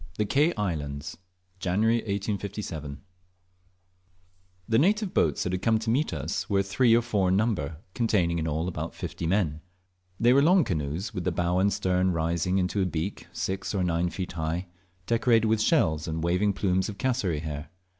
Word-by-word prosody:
THE 105 - +1
KE 145 +10 +3
ISLANDS. 75 -7 -3 0.4
(JANUARY 105 +6 +2
1857) 100 -8 -4 1.7
THE 115 - +3
native 205 +5 +2
boats 75 -4 +2
that 90 - -2
had 90 0 -2
come 110 +1 +3
to 110 +1 -1
meet 145 +6 +1
us 75 0 -3
were 100 -1 +2
three 115 +4 +3
or 120 - +3
four 105 -6 +1
in 95 - +3
number, 95 -8 0 0.2
containing 90 -8 +1
in 80 - -2
all 80 +3 -1
about 80 -2 -4
fifty 80 - -4
men. 80 -5 0 0.6
They 120 +2 +5
were 140 - +5
long 175 +4 +5
canoes, 80 - -3
with 90 -4 -3
the 90 - 0
bow 90 +1 0
and 100 +2 +3
stern 95 -2 +1
rising 85 +2 0
up 95 - +3
into 95 +2 0
a - - +2
beak 85 +3 -4
six 95 +2 -3
or 95 - +1
night 85 0 0
feet 95 -2 -4
high, 80 +2 -2 0.4
decorated 115 -1 +3
with 110 0 +2
shells 80 - +2
and 80 0 -3
waving 90 +4 +2
plumes 95 -1 0
of 100 - -7
cassowaries 95 - -1
hair. 75 -1 -5
95 Hz, 180 wpm, -27 LUFS, 85-110 Hz, 1.7 s, They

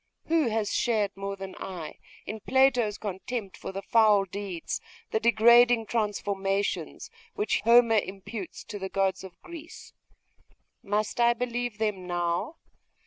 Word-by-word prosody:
Who 320 -4 +2
has 220 -2 -1
shared 210 -4 +1
more 195 0 -4
than 190 -1 -8
I 170 -5 -7 0.3
in 220 - -5
Plato's 245 -4 +2
contempt 200 +1 -5
for - - -7
the 195 +1 -6
foul 215 -3 +4
deeds, 190 -3 -5 0.3
the 220 - +1
degrading 235 +1 +5
transformations, 200 - -2 0.2
which 420 0 0
Homer 230 -1 +6
imputes 195 0 -7
to 205 - -7
the 190 0 -4
gods 195 0 0
of 185 -2 -12
Greece? 330 -2 -11 0.9
Must 210 +4 -2
I 235 0 +4
believe 245 -2 -3
them 210 -4 -2
now? 175 - -1
210 Hz, 135 wpm, -27 LUFS, 195-235 Hz, 0.9 s, Homer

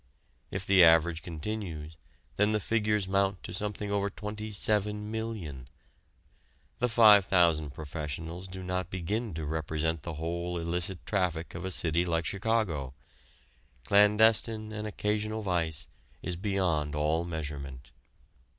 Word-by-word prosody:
If 95 0 -3
the 95 -2 +6
average 80 0 +5
continues, 80 -2 -5 0.4
then 105 +1 +3
the 105 - +2
figures 105 -2 +1
mount 95 0 +1
to - - -7
something 105 +1 -3
over 100 0 +1
27,000,000. 105 - -3 1.1
The 125 - +2
five 110 -3 +8
thousand 80 -6 +3
professionals 80 +3 -5
do 95 0 -8
not 90 -1 -2
begin 100 +3 -3
to 80 -1 -4
represent 80 +1 -1
the 80 +2 -6
whole 85 +2 -3
illicit 85 +2 -2
traffic 90 -5 -1
of 85 +2 -6
a - - -2
city 85 -1 +1
like 85 -1 0
Chicago. 100 - -1 0.9
Clandestine 110 +1 +4
and 105 0 -4
occasional 105 +1 -1
vice 80 -6 -1 0.4
is 90 - -2
beyond 85 -6 0
all 75 +3 +1
measurement. 70 -6 -6
90 Hz, 125 wpm, -30 LUFS, 80-105 Hz, 1.1 s, five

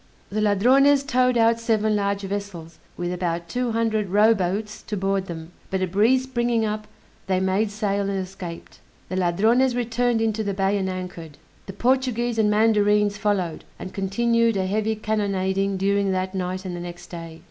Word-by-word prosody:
The 215 +1 -1
Ladrones 260 +8 +4
towed 255 -2 +2
out 230 0 +3
seven 220 -2 +1
large 200 -1 0
vessels, 195 -5 -6 0.2
with 175 0 -2
about 170 -1 -2
two 245 +5 -2
hundred 220 -3 0
rowboats 210 0 +2
to 210 - -5
board 195 0 -1
them; 165 -1 -7 0.2
but 190 -1 -1
a - - +3
breeze 220 +8 +3
springing 240 -3 0
up, 215 0 -3 0.4
they 185 -1 +1
made 190 +3 +1
sail 200 -1 -1
and 195 - -1
escaped. 185 -2 -7 0.3
The 185 - -3
Ladrones 220 +8 +2
returned 240 0 0
into 220 -1 0
the 200 -2 -2
bay, 195 +1 +1
and 190 -1 -1
anchored. 180 -5 -7 0.3
The 195 - -6
Portuguese 240 0 0
and 210 -1 +3
mandarines 210 -1 +3
followed, 195 -5 -1
and 185 - -8
continued 230 +3 +1
a 190 - 0
heavy 215 +3 0
cannonading 195 -2 -1
during 200 +1 +1
that 185 +1 -2
night 185 0 -3
and 180 -1 -4
the - - -5
next 175 0 -9
day. 165 -2 -8
205 Hz, 170 wpm, -23 LUFS, 185-225 Hz, 0.4 s, Ladrones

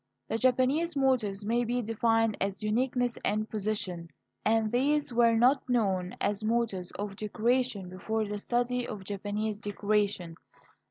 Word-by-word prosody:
The 225 - -1
Japanese 260 +6 +2
motives 235 -8 +1
may 235 +3 +1
be 245 +1 -1
defined 225 0 +2
as 195 +1 -2
uniqueness 245 +2 0
and 215 +1 0
position. 200 -6 -3 0.3
And 220 0 +2
these 290 +2 +1
were 230 -1 +4
not 255 +3 +3
known 190 -7 +1
as 205 +1 -1
motives 215 -5 0
of 205 -1 -4
decoration 220 0 0
before 215 +4 -2
the 205 0 -4
study 245 +2 0
of 210 -5 -6
Japanese 205 +2 -3
decoration. 205 -4 -1
220 Hz, 140 wpm, -29 LUFS, 205-245 Hz, 0.3 s, were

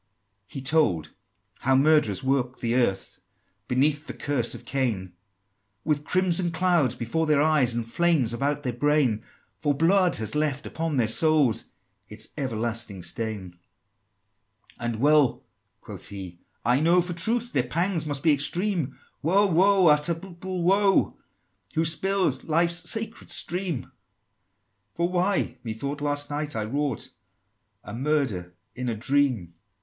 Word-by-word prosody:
He 135 -3 -8
told 115 - +1 0.5
how 135 +1 +2
murderers 140 -6 +3
walk 130 -2 0
the 115 -1 -1
earth 120 -6 0 0.5
Beneath 145 +4 +1
the - - -6
curse 135 -5 0
of - - -11
Cain, 110 -10 -2 0.7
With 150 -1 -1
crimson 180 -1 +1
clouds 165 -7 +1
before 125 +8 -1
their 150 -2 +3
eyes, 150 -6 +3
And 115 -1 -3
flames 150 -4 +2
about 145 +4 -1
their 125 -3 -2
brain: 130 -3 +1 0.4
For 145 -2 +1
blood 180 +4 +3
has 110 -1 -3
left 150 -2 -1
upon 160 -3 -3
their 120 -3 +2
souls 145 -1 +3 0.4
Its 105 +1 -6
everlasting 115 - -3
stain! 110 -3 -4
XIII. 85 - -29 1.2
"And 120 -1 -2
well," 145 +2 +3 0.4
quoth - - -9
he, 95 -4 -8 0.3
"I 125 +2 +3
know, 170 +4 +4
for 175 0 -1
truth, 230 +8 -1
Their 130 - +3
pangs 165 +7 -1
must 145 -3 -4
be 160 -2 +5
extreme, 170 +2 0 0.2
Woe, 190 +6 +4
woe, 190 +1 +4
unutterable 170 +4 0
woe, 195 +2 +3 0.6
Who 160 +1 +2
spill 190 +4 +2 0.2
life's 170 +2 +1
sacred 225 0 -4
stream! 175 -4 -2 1.0
For 170 +1 +1
why? 180 -8 0
Methought, 140 +6 -4
last 145 0 -2
night, 145 -1 -3
I 110 - -1
wrought 135 +2 -2 0.7
A 105 - -9
murder, 120 -10 -1 0.2
in 125 0 -4
a 115 - -2
dream!" 125 -5 +1
XIV. - - -28
145 Hz, 140 wpm, -25 LUFS, 120-170 Hz, 1.2 s, be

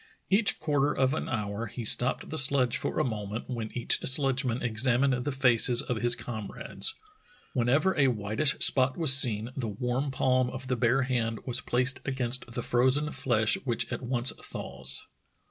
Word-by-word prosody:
Each 200 -1 +2
quarter 145 -2 0
of 130 +1 0
an 160 - -4
hour 110 -2 -4
he 115 +2 -8
stopped 125 +4 0
the 160 - -4
sledge 135 -3 +5
for - - -4
a - - +1
moment, 110 -2 -5
when 115 -4 -5
each 120 - +2
sledgeman 130 -2 +1
examined 125 +3 +1
the 125 +4 -3
faces 125 -2 +5
of 125 - -4
his 120 0 +3
comrades. 120 - -4 0.6
When 120 -1 -1
ever 155 +9 +1
a 140 -2 +2
whitish 110 +4 0
spot 130 -1 +1
was 160 -6 +6
seen, 115 -4 +4
the 125 -4 -4
warm 125 +6 -3
palm 130 -1 0
of 130 +1 -8
the 130 - 0
bare 125 +2 +1
hand 115 -3 -3
was 125 - 0
placed 130 +2 -1
against 125 -2 -3
the 120 0 -5
frozen 130 +5 0
flesh 110 -4 0
v/hich 120 -4 -3
at - - -5
once 125 0 +2
thaws. 65 +1 -8
125 Hz, 175 wpm, -27 LUFS, 115-135 Hz, 0.6 s, was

